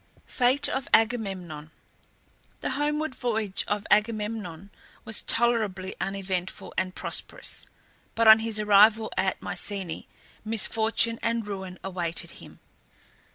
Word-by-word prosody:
FATE 255 +3 +2
OF 265 0 -2
AGAMEMNON. 190 -9 -1 0.9
The - - -2
homeward 295 +2 -1
voyage 220 -6 -1
of 205 0 -2
Agamemnon 210 -4 0 0.3
was 220 - 0
tolerably 215 -6 0
uneventful 190 -2 -3
and 185 0 -2
prosperous; - - -1 0.5
but 230 0 +3
on 220 0 +10
his 220 -1 0
arrival 210 +1 +5
at 190 - -1
Mycenae 180 -1 -4 0.4
misfortune 225 +1 +2
and 230 -1 -1
ruin 190 -3 -6
awaited 175 -3 -2
him. - - -14
210 Hz, 110 wpm, -27 LUFS, 190-230 Hz, 0.9 s, on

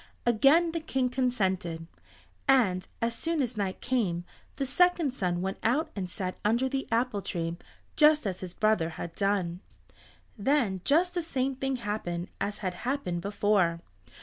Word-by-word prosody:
Again 275 +9 +5
the 330 - -2
King 265 -5 0
consented, 190 -10 -1 0.6
and 205 -10 +3 0.2
as 230 0 +1
soon 330 +6 -2
as 250 -3 0
night 195 -3 -2
came 205 -9 0 0.3
the 275 - -1
second 330 0 +3
son 180 -6 -1
went 190 0 -3
out 305 +8 +1
and 185 -3 -3
sat 185 0 -4
under 235 +5 +2
the 270 +1 -2
apple 230 -3 +1
tree 165 -2 -3 0.4
just 305 -2 +5
as 185 -2 -2
his 180 -2 -7
brother 215 -7 +2
had 170 - -5
done. 195 -4 0 0.8
Then 220 -5 +1
just 340 +5 +3
the 355 - 0
same 270 -4 -1
thing 270 0 -1
happened 205 -7 -3
as 205 - -1
had 185 - 0
happened 240 -10 -2
before. 200 -3 +2
220 Hz, 155 wpm, -29 LUFS, 185-270 Hz, 0.8 s, Again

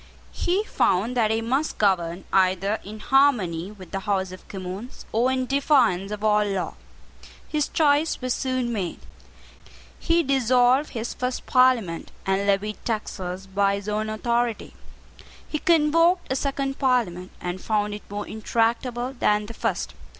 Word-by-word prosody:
He 375 +4 0
found 225 - +1
that 225 -3 +3
he 220 +1 +1
must 265 +7 -1
govern 180 -3 +1
either 190 +2 +2
in 210 +2 -9
harmony 215 -11 +2
with 190 -5 -13
the 195 - -2
House 195 -2 -1
of 185 - -12
Commons 195 +5 -7
or 240 +4 +2
in 260 -1 0
defiance 250 - +2
of 210 0 -5
all 210 -1 +4
law. 195 -3 -2 0.7
His 300 -2 0
choice 300 0 +2
was 255 -1 -1
soon 255 -2 -1
made. 190 -6 -3 1.0
He 335 0 +2
dissolved 255 0 +3
his 230 0 -3
first 250 0 -3
Parliament, 250 -10 +2 0.2
and 195 +1 0
levied 200 +1 0
taxes 190 -4 -4
by 200 +1 +1
his 200 0 -7
own 215 +1 -1
authority. 235 +1 -1 0.7
He 305 - -3
convoked 330 +2 +3
a - - +2
second 275 0 -2
Parliament, 220 -10 +1
and 180 +1 -4
found 210 -1 0
it 210 - -6
more 205 +1 -5
intractable 235 +3 -1
than 210 0 +2
the 230 - -8
first. - - -2
220 Hz, 150 wpm, -24 LUFS, 195-260 Hz, 1.0 s, all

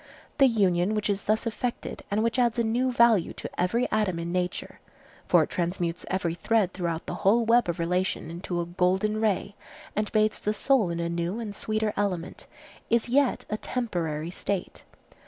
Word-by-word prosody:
The 270 - +8
union 195 -3 +2
which 210 -1 0
is 200 0 -3
thus 220 +2 +1
effected 235 +1 -3
and 210 +2 +1
which 230 +2 +1
adds 240 -1 +2
a 235 - +2
new 245 +3 +1
value 235 -7 +4
to - - -6
every 230 +8 +1
atom 210 -5 +1
in 170 0 -4
nature—for 180 0 -1
it - - -5
transmutes 175 -1 -2
every 180 -3 0
thread 195 +2 +1
throughout 170 -3 -3
the - - -4
whole 225 +4 +4
web 235 -3 +4
of 170 - -1
relation 180 -1 -1
into 175 +1 -4
a 170 - -1
golden 190 +5 +1
ray, 205 -2 0 0.4
and 210 0 -1
bathes 215 -1 +2
the 210 +1 -1
soul 245 -4 +2
in 170 0 -3
a 170 - -1
new 170 +5 -2
and 215 -3 -5
sweeter 215 +1 -1
element—is 205 +4 -3
yet 270 0 +2
a 215 - 0
temporary 170 -11 -3
state. 195 0 -4
205 Hz, 175 wpm, -27 LUFS, 175-225 Hz, 0.4 s, The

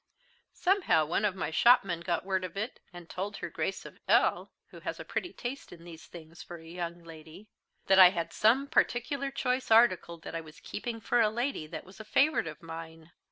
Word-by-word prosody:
Somehow 360 - +2
one 175 +7 0
of 200 -3 0
my 190 - -3
shopmen 195 -2 +4
got 170 +1 -2
word 190 -1 -1
of 185 +1 -6
it, 220 +5 -4
and 175 -2 -11
told 195 +4 -5
her - - -6
Grace - - -3
of - - -12
L - - +3 0.2
(who - - -12
has - - -5
a - - -7
pretty 355 - -3
taste 260 +3 -7
in 170 -1 -12
these 170 0 -12
things 165 -1 -12
for 175 - -9
a 165 - -15
young 170 0 -6
lady) 165 +5 -13 0.4
that 195 0 +5
I 185 -1 +11
had 170 -3 -4
some 245 +6 +3
particular 275 +1 0
choice 255 -1 -2
article 205 -7 +4
that - - -8
I 165 - -3
was 155 -1 -14
keeping 225 +1 -6
for 240 +2 +2
a 215 - +4
lady 235 - -3
that - - -8
was 190 +3 -15
a - - -7
favourite 270 - +2
of 165 - -9
mine. 165 0 -9
185 Hz, 210 wpm, -30 LUFS, 165-235 Hz, 0.4 s, I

